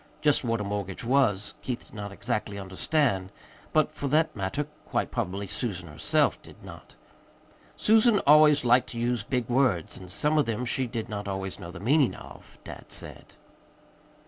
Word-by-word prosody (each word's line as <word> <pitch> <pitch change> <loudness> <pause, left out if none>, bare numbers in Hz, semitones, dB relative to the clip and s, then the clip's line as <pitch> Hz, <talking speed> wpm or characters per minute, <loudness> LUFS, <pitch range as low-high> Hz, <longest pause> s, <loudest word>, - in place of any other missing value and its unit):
Just 150 -2 +2
what 115 -2 0
a - - -2
mortgage 100 -2 -4
was, 115 -6 +2
Keith 125 -2 -4
did - - -21
not 100 -2 -6
exactly 100 0 -3
understand; 95 +1 0 0.4
but, 155 -1 +2
for 145 - -4
that 155 +3 +2
matter, 100 +8 -2 0.2
quite - - -1
probably 100 -4 -3
Susan 100 -3 -4
herself 75 -1 +1
did - - -16
not. - - -12 0.8
Susan 220 0 +5
always 150 -1 +6
liked 125 +1 +4
to 115 - -6
use 120 -1 0
big 120 +3 -2
words, 120 -10 +1
and 90 -1 -11
some 150 - +1
of 145 - +2
them 115 +2 -2
she 130 +1 0
did 115 -2 -4
not 105 -1 -5
always 95 -1 -4
know 85 - -8
the 90 0 -9
meaning 135 - +3
of, - - -13
dad - - -9
said. - - -4
115 Hz, 170 wpm, -27 LUFS, 100-140 Hz, 0.8 s, always